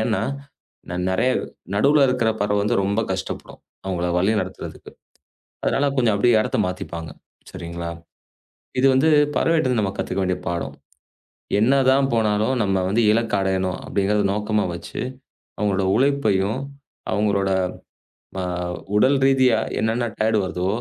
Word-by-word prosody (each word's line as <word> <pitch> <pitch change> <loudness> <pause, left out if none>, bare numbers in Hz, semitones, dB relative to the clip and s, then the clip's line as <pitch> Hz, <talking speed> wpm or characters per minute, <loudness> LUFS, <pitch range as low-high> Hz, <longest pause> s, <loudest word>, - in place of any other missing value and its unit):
ஏன்னா 110 0 0 0.9
நிறைய 115 +8 +2 0.5
நடுவுல 140 +5 +5
இருக்குற 115 -3 +1
பறவை 105 0 +1 0.2
ரொம்ப 100 +3 0
கஷ்டப்படும். 95 0 -6 0.2
அவங்கள 90 -2 -2
வழிநடத்துறதுக்கு. 105 +4 -2 0.7
அதனால 145 - +1
கொஞ்சம் 115 -5 +3
அப்படியே 115 +3 +4
இடத்த - - -2
மாத்திப்பாங்க. 85 -3 -6 0.4
சரிங்களா? 85 -1 -6 0.9
இது 135 - +5
வந்து 155 +5 +4 0.3
பறவைட்ட 155 -7 +2
நாம 100 -1 -1
கத்துக்க 95 - -2
வேண்டிய 90 -1 -1
பாடம். 85 -1 -3 0.9
என்னதான் 135 +3 +4
போனாலும் 110 +2 +1
நம்ம 95 -1 +1
வந்து 115 +3 +2
இலக்கை 115 -2 +1
அடையணும் 95 -1 -1
அப்படிங்கறது 100 +1 +1
நோக்கமா 105 0 0
வச்சு 85 - -8 0.6
அவங்களோட 100 -2 0
உழைப்பையும், 130 -5 +1 0.5
அவங்களோட 100 -2 +1 0.9
அ - - -2 0.5
உடல் 135 +6 +4
ரீதியா 130 -4 +4 0.2
என்னென்ன 115 +2 0 0.2
டயர்டு 110 0 +2
வருதோ, 90 0 -2
105 Hz, 115 wpm, -22 LUFS, 95-125 Hz, 0.9 s, நடுவுல